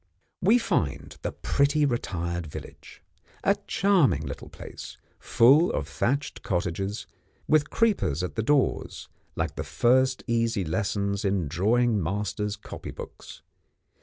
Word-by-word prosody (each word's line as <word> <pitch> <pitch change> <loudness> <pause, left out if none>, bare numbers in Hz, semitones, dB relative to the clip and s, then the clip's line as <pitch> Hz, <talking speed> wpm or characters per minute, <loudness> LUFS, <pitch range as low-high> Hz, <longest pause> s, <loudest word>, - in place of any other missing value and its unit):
We 215 +7 +5
find 75 - -1
the - - -2
pretty, 145 +1 +1
retired 85 - -2
village. 75 - -11 0.4
A - - +4
charming 190 -7 +3
place, - - -9 0.2
full 140 +9 +5
of - - -2
thatched 140 +4 -1
cottages, 95 +2 -2 0.4
with 155 -1 +3
creepers 200 - +1
at 90 - -3
the 110 - -1
doors, 140 +4 0 0.3
like - - -2
the - - -2
first 130 +2 +2
easy 115 -4 0
lessons 100 +3 -1
in 95 -5 0
drawing 110 - +2
masters' 105 +3 -2
copy 105 - -9
books. - - -10
110 Hz, 120 wpm, -26 LUFS, 95-140 Hz, 0.4 s, We